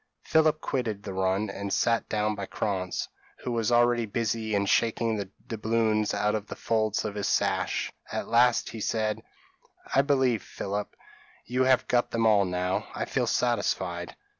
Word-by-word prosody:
p> -, -, -18 dB
Philip 155 Hz, -1 st, +4 dB
quitted 110 Hz, -6 st, -2 dB
the 100 Hz, -, -5 dB
run, 95 Hz, +2 st, 0 dB
and 100 Hz, 0 st, -5 dB
sat 115 Hz, +2 st, +1 dB
down 105 Hz, 0 st, 0 dB
by 100 Hz, -2 st, -5 dB
Krantz, 95 Hz, -3 st, -2 dB, 0.4 s
who 125 Hz, -, -2 dB
was 115 Hz, -1 st, 0 dB
already 120 Hz, -1 st, +3 dB
busy 110 Hz, 0 st, -1 dB
in 100 Hz, 0 st, +1 dB
shaking 115 Hz, +2 st, +2 dB
the 100 Hz, -2 st, -4 dB, 0.2 s
doubloons 110 Hz, -2 st, +1 dB
out 105 Hz, +1 st, +1 dB
of 105 Hz, -1 st, -3 dB
the -, -, -6 dB
folds 110 Hz, -2 st, 0 dB
of 105 Hz, -, -3 dB
his 100 Hz, -1 st, -2 dB
sash -, -, 0 dB, 0.2 s
at -, -, -3 dB
last 120 Hz, 0 st, +3 dB
he 110 Hz, -, -7 dB
said 110 Hz, 0 st, -1 dB, 0.7 s
"I 135 Hz, -, +6 dB
believe, 130 Hz, -5 st, +2 dB
Philip, 100 Hz, +1 st, -5 dB, 0.5 s
you 130 Hz, +1 st, +1 dB
have 130 Hz, -1 st, +3 dB
got 120 Hz, -1 st, +2 dB
them 115 Hz, -1 st, 0 dB
all 105 Hz, -3 st, +5 dB
now? 90 Hz, 0 st, -1 dB
I -, -, -2 dB
feel -, -, -1 dB
satisfied." 95 Hz, -7 st, -1 dB
110 Hz, 170 wpm, -27 LUFS, 100-120 Hz, 0.7 s, I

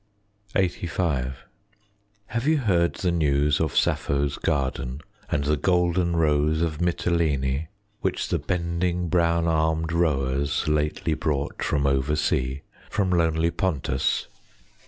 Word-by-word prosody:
LXXXV 85 Hz, -8 st, 0 dB, 0.9 s
Have 115 Hz, +6 st, -3 dB
you 160 Hz, 0 st, +4 dB
heard 90 Hz, -10 st, +2 dB
the 90 Hz, -, 0 dB
news 75 Hz, -3 st, +2 dB
of 80 Hz, -5 st, -1 dB
Sappho's 70 Hz, 0 st, +1 dB
garden, 65 Hz, -1 st, -1 dB, 0.3 s
And 70 Hz, -, 0 dB
the 75 Hz, +1 st, +1 dB
Golden 90 Hz, +1 st, +1 dB
Rose 80 Hz, 0 st, +2 dB
of 80 Hz, -2 st, -2 dB
Mitylene, 80 Hz, -5 st, 0 dB, 0.3 s
Which -, -, -2 dB
the -, -, 0 dB
bending 85 Hz, 0 st, -1 dB
brown 85 Hz, 0 st, +2 dB
armed 80 Hz, 0 st, +1 dB
rowers 70 Hz, -4 st, 0 dB
lately 75 Hz, +1 st, 0 dB
Brought 75 Hz, -2 st, -2 dB
from 70 Hz, -1 st, 0 dB
over 70 Hz, +2 st, +1 dB
sea, 65 Hz, -2 st, -1 dB, 0.3 s
from 95 Hz, -3 st, 0 dB
lonely 85 Hz, -1 st, +2 dB
Pontus? 75 Hz, -9 st, 0 dB
80 Hz, 115 wpm, -25 LUFS, 70-85 Hz, 0.9 s, you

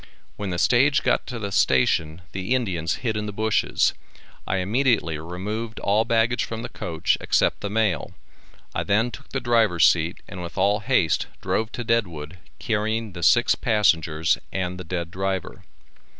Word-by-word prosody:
When 100 Hz, -2 st, -4 dB
the 90 Hz, -, -2 dB
stage 135 Hz, +8 st, +3 dB
got -, -, +1 dB
to 125 Hz, -, -5 dB
the 100 Hz, -3 st, -4 dB
station 80 Hz, -2 st, +2 dB
the 95 Hz, +7 st, -1 dB
Indians 90 Hz, -10 st, -1 dB
hid 110 Hz, -2 st, 0 dB
in 105 Hz, 0 st, -2 dB
the -, -, -3 dB
bushes. 110 Hz, +1 st, +1 dB, 0.5 s
I 95 Hz, -, 0 dB
immediately 105 Hz, -, +1 dB
removed 105 Hz, +7 st, -5 dB
all 105 Hz, +3 st, +2 dB
baggage 115 Hz, +1 st, +2 dB
from 115 Hz, 0 st, -5 dB
the -, -, -5 dB
coach 80 Hz, -1 st, -1 dB
except -, -, +2 dB
the 100 Hz, -, -3 dB
mail. 105 Hz, -7 st, 0 dB, 0.6 s
I -, -, -1 dB
then 110 Hz, +4 st, +1 dB
took 140 Hz, -, -12 dB
the 135 Hz, -, -2 dB
driver's 115 Hz, -8 st, +4 dB
seat 85 Hz, 0 st, +1 dB
and 90 Hz, -2 st, -8 dB
with 85 Hz, -, -8 dB
all 100 Hz, +2 st, +3 dB
haste 105 Hz, -, +1 dB
drove 110 Hz, +1 st, -1 dB
to 120 Hz, -, -4 dB
Deadwood, 90 Hz, -8 st, -2 dB, 0.2 s
carrying 110 Hz, 0 st, -1 dB
the 85 Hz, -, -7 dB
six -, -, +5 dB
passengers 80 Hz, -7 st, +2 dB
and 90 Hz, -1 st, -3 dB
the -, -, -5 dB
dead 85 Hz, 0 st, -4 dB
driver. 95 Hz, 0 st, -3 dB
100 Hz, 165 wpm, -24 LUFS, 90-115 Hz, 0.6 s, six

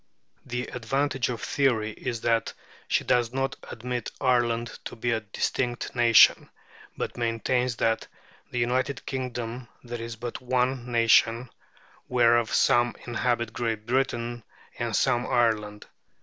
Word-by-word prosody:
The 125 Hz, +1 st, -2 dB
advantage 135 Hz, +2 st, -1 dB
of 120 Hz, -4 st, -4 dB
theory 115 Hz, -6 st, +1 dB
is 115 Hz, +1 st, -5 dB
that 115 Hz, -1 st, +1 dB, 0.3 s
she -, -, +1 dB
does 120 Hz, -2 st, +2 dB
not 135 Hz, +1 st, -1 dB
admit 125 Hz, 0 st, -4 dB
Ireland 120 Hz, -2 st, +1 dB
to -, -, -6 dB
be 120 Hz, +1 st, -1 dB
a 115 Hz, -, +1 dB
distinct 120 Hz, +4 st, -2 dB
nation, 120 Hz, -2 st, +6 dB, 0.5 s
but -, -, -4 dB
maintains 120 Hz, +1 st, 0 dB
that 115 Hz, 0 st, 0 dB, 0.4 s
in -, -, -35 dB
the -, -, -2 dB
United 125 Hz, +2 st, 0 dB
Kingdom 125 Hz, -2 st, -4 dB, 0.2 s
there 120 Hz, -1 st, -6 dB
is 115 Hz, 0 st, -6 dB
but 120 Hz, +1 st, -6 dB
one 125 Hz, 0 st, 0 dB
nation, 115 Hz, +1 st, +3 dB, 0.6 s
whereof 120 Hz, -2 st, +3 dB
some 120 Hz, 0 st, +3 dB
inhabit 120 Hz, -1 st, -1 dB
Great 115 Hz, -3 st, -2 dB
Britain 120 Hz, -2 st, -1 dB, 0.4 s
and -, -, -1 dB
some 120 Hz, +1 st, +2 dB
Ireland. 110 Hz, -4 st, 0 dB
120 Hz, 135 wpm, -26 LUFS, 115-125 Hz, 0.6 s, nation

